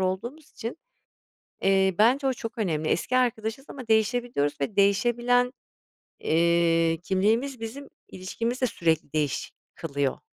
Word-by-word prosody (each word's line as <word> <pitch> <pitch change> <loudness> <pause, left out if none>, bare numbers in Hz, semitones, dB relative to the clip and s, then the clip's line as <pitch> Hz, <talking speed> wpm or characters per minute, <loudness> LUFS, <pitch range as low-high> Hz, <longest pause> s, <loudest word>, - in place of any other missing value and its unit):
olduğumuz 235 +12 -3
için, 235 +7 -6 0.8
eee, 190 -1 +3
bence 260 +6 +4
o 265 - +3
çok 230 0 -7
önemli. 160 -7 -1
Eski 255 +9 0
arkadaşız 235 0 0
ama 255 -4 -9
değişebiliyoruz 220 - +1
ve 165 +9 -3
değişebilen, 240 +5 +3 0.7
eee, 165 0 +2
kimliğimiz 225 +8 0
bizim 260 +6 -7 0.2
ilişkimizi 230 +7 -4
de 255 - +3
sürekli 160 - -1
değiş 150 -3 -1 0.2
kılıyor. 140 -4 -2
220 Hz, 120 wpm, -26 LUFS, 170-245 Hz, 0.8 s, bence